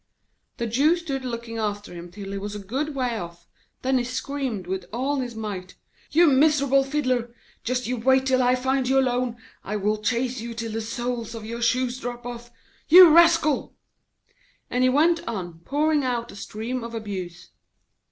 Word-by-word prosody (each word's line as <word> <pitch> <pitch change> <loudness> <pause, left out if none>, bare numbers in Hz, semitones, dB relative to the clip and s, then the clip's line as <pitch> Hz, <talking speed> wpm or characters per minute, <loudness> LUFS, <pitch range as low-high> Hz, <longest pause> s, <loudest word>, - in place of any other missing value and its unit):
The 235 - -2
Jew 275 +9 +3
stood 285 -6 -4
still 255 - -4
looking 230 -1 -5
after 205 -2 -3
him 175 0 -9
till 195 +2 -8
he 200 - -3
was 205 +1 -5
a - - -5
good 270 +9 -3
way 245 -4 -1
off, 170 -1 -9 0.4
then 260 0 +2
he - - -1
screamed 250 -4 -3
with 185 0 -4
all 265 +6 -1
his 245 -3 -4
might: 200 -4 -6 0.3
'You 340 +3 +5
miserable 280 -2 +4
fiddler! 255 -4 -1 0.3
Just 250 +1 -1
you 250 +1 -2
wait 265 +3 +3
till 260 -1 +3
I 250 0 +4
find 260 0 0
you 270 - +3
alone! 250 -2 +1 0.3
I 210 - -4
will 210 +1 0
chase 245 +3 -1
you 230 0 -6
till 230 -1 -4
the 225 +1 -3
soles 235 0 -4
of 220 -1 -7
your 235 +2 -5
shoes 250 +1 +1
drop 245 -1 -6
off 240 0 -7 0.4
you 345 -1 +9
rascal!' 330 -4 +4 1.0
And 250 +1 +1
he 255 - +5
went 325 +6 +3
on 180 -7 -5
pouring 300 +1 +1
out 240 -2 -2
a - - -12
stream 230 +4 -5
of 230 0 -6
abuse. 190 -5 -6
245 Hz, 185 wpm, -24 LUFS, 220-265 Hz, 1.0 s, you